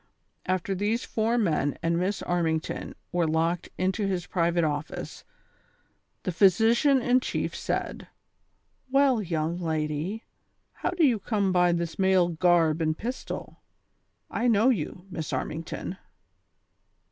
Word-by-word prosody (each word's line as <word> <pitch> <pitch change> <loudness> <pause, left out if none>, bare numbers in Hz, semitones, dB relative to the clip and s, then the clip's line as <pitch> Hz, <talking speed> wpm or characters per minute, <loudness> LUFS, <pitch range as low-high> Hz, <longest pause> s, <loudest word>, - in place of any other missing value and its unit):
After 185 +1 0
these 210 +5 -1
four 225 +2 0
men 155 - +1
and 170 0 +1
Miss 185 +4 -1
Armington 165 -2 -1 0.2
were 175 -2 +1
locked 165 +2 0
into 190 +3 0
his 180 -2 -2
private 170 -1 +1
office, 150 0 -4 1.0
the 185 - -1
pliysician 225 - +4
in 250 0 +4
chief - - -3
said: - - -3 0.4
" - - -45 0.3
Well, 270 -3 +3
young 165 -2 -2
lady; 160 +5 -2 0.5
how - - -2
do 355 -3 +3
you 240 -6 +3
come 200 -1 0
by 180 -1 +4
this 170 0 -2
male 190 -2 +4
garb 170 -2 +3
and 155 0 0
pistol 250 +3 -6
V - - -47
I 240 - +2
know 225 +2 +4
you. 180 - -2
Miss 160 -3 -4
Armington.'' 165 +3 -4
180 Hz, 135 wpm, -27 LUFS, 165-220 Hz, 1.0 s, pliysician